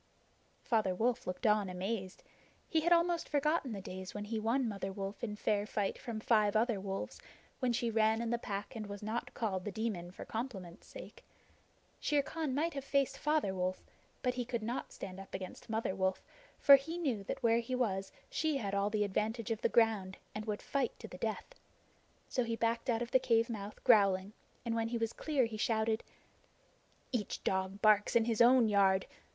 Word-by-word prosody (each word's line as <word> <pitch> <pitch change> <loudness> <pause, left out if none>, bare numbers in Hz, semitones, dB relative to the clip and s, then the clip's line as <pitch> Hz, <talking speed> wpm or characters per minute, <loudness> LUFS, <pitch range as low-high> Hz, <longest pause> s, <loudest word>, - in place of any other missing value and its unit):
Father 215 -6 +1
Wolf 235 +4 0
looked 180 +6 -4
on 210 -3 +3
amazed. 185 +1 -4 0.4
He 320 - +2
had 345 +2 +1
almost 340 0 +3
forgotten 295 -2 +1
the 200 -3 -4
days 185 0 -7
when 205 0 -4
he 220 +1 -2
won 235 +4 +1
Mother 195 -3 -3
Wolf 195 +2 -5
in 210 -3 -2
fair 210 0 0
fight 205 -2 -1
from 230 -3 -5
five 215 -2 +3
other 225 -1 +2
wolves, 195 0 -4 0.4
when 255 -2 +1
she 235 0 0
ran 220 0 +3
in 235 0 -2
the 235 - +1
Pack 205 +2 -5
and 215 -2 -5
was 205 0 -7
not 220 +3 -3
called 195 -6 -1
The 210 - -3
Demon 200 -5 -3
for 180 - -9
compliment's 205 -7 -6
sake. - - -11 0.8
Shere 290 -1 +2
Khan 305 -2 -3
might 325 +3 0
have 275 -1 -4
faced 275 0 +1
Father 300 -10 +1
Wolf, 185 0 -2 0.4
but 250 -1 +2
he 250 0 -2
could 235 -2 -3
not 235 +4 -3
stand 190 0 -7
up 195 - -8
against 190 +3 -7
Mother 220 -3 -1
Wolf, 190 0 0 0.3
for 280 -1 +9
he 320 +5 -5
knew 260 -12 -1
that - - -4
where 230 0 +4
he 235 +2 -3
was 195 -6 -1 0.2
she 315 -3 0
had 200 -6 -3
all 200 +1 +1
the 210 0 +1
advantage 220 +3 -1
of 225 - -2
the - - +2
ground, 215 -5 +2 0.2
and 210 0 -5
would 210 -2 -3
fight 275 -4 -1
to 225 - -9
the 180 - -10
death. 225 - -3 0.7
So 250 - 0
he 230 -1 -2
backed 230 +2 0
out 235 0 +2
of 235 - -8
the 260 - +5
cave 230 -1 +2
mouth 210 -1 -7
growling, 200 -3 +4 0.3
and 230 - 0
when 225 0 0
he 235 +1 -2
was 225 -1 -1
clear 290 -5 +1
he 225 -1 -5
shouted: 220 0 +1 1.1
"Each 235 -6 -2
dog 190 +1 -1
barks 210 0 +5
in 230 -1 +5
his 230 -1 +1
own 245 -1 +7
yard! 195 -2 +4
220 Hz, 200 wpm, -34 LUFS, 200-240 Hz, 1.1 s, for